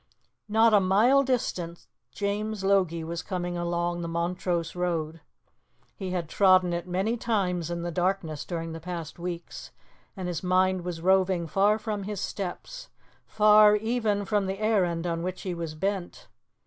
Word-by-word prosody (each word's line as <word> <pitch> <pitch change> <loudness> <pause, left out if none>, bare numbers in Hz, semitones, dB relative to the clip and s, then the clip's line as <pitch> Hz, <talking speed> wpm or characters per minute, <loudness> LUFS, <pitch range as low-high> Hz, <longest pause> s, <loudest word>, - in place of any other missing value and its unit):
Not 220 +1 +4
a 205 - +7
mile 210 +9 +4
distant, 185 -10 -2 0.3
James 205 +3 -3
Logie 185 -4 +2
was 165 +1 -4
coming 175 0 -3
along 175 0 -1
the 170 - -4
Montrose 170 0 -2
road. 165 -3 -2 0.7
He 190 -2 -5
had 180 -3 -2
trodden 185 0 +4
it 170 +1 -3
many 195 +6 0
times 180 -8 -1
in 170 0 -3
the 175 - -3
darkness 175 -3 -1
during 165 -2 -4
the 165 - -6
past 170 -1 -6
weeks, 175 -1 -6 0.5
and 185 -1 -4
his 175 -2 -3
mind 185 0 +2
was 175 -2 -5
roving 185 -1 +2
far 200 +6 +2
from 210 -3 -4
his 205 -1 -4
steps, 205 - -5 0.4
far 210 0 +6
even 215 -2 0
from 205 -1 0
the 190 +1 -3
errand 185 -6 +1
on 165 -1 -1
which 185 +1 -4
he 185 - -3
was 165 -2 -5
bent. 190 +2 -3
185 Hz, 160 wpm, -27 LUFS, 170-205 Hz, 0.7 s, a